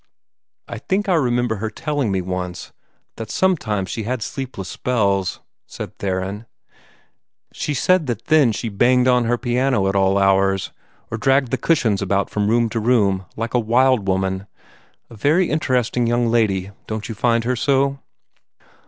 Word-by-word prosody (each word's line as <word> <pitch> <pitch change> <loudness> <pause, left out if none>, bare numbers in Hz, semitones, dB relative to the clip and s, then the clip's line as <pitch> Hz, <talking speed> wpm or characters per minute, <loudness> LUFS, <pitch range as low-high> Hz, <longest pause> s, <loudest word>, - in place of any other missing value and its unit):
"I - - -6
think 205 +2 -1
I 190 - +2
remember 120 -7 +1
her 110 +3 -3
telling 145 -1 -2
me 95 -1 0
once 90 -1 -5 0.4
that 115 -1 -6
sometimes 110 - 0
she 115 - -3
had 120 +1 -3
sleepless 125 -8 -6
spells," 100 -6 -1 0.3
said - - -8
Theron. 95 +3 -3 1.1
"She 150 - -3
said 185 +3 +2
that 115 -2 -4
then 150 -6 +4
she 115 - -4
banged 125 +4 +3
on 125 -1 +3
her 120 +1 +1
piano 120 -4 +1
at 95 - -1
all 95 0 +3
hours, 95 0 +2 0.4
or 110 - -3
dragged 135 +1 +2
the 130 - +1
cushions 115 -12 +1
about 100 0 0
from 105 -1 0
room 120 +1 +3
to 115 - -2
room, 105 -5 +2
like 115 +1 -4
a 125 - +3
wild 120 -1 +2
woman. 95 +1 -1 0.6
A - - -10
very 155 - +2
interesting 125 -5 0
young 120 +1 +1
lady, 100 -5 +1 0.2
don't 110 -1 -4
you 115 - -5
find 115 +1 +1
her 125 +2 0
so?" 140 +2 +1
115 Hz, 160 wpm, -20 LUFS, 100-130 Hz, 1.1 s, then